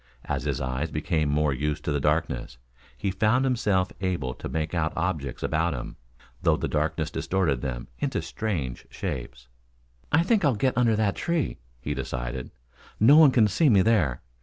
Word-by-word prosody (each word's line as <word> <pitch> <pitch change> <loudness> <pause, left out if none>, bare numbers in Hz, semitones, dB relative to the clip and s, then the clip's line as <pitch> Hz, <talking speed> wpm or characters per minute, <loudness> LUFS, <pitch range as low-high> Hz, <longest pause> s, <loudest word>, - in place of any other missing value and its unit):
As - - -2
his - - -1
eyes 65 +4 -2
became 75 -1 0
more 75 0 +2
used 75 +3 -2
to - - 0
the 75 - +1
darkness 75 -5 -1 0.4
he 95 - -1
found 110 +7 +2
himself 105 -8 +1
able 85 -10 -1
to - - -7
make 80 +1 -2
out 80 -2 0
objects 80 -7 -2
about 80 0 0
him, - - -6 0.5
though - - +3
the - - -2
darkness - - -1
distorted 85 -10 0
them 65 -4 -4
into - - -1
strange 80 - -4
shapes. 65 -1 -6 0.6
"I 160 - +4
think 210 +2 +2
I'll 140 -5 +3
get 130 +5 +1
under 115 -3 +3
that 105 -2 +1
tree," 170 -3 -1 0.2
he 70 +4 -3
decided. 60 -1 -4 0.5
"No 120 +7 +7
one 155 -2 +8
can 115 -5 +4
see 145 - +3
me 100 -5 +5
there. 90 - +2
85 Hz, 175 wpm, -26 LUFS, 70-110 Hz, 0.6 s, one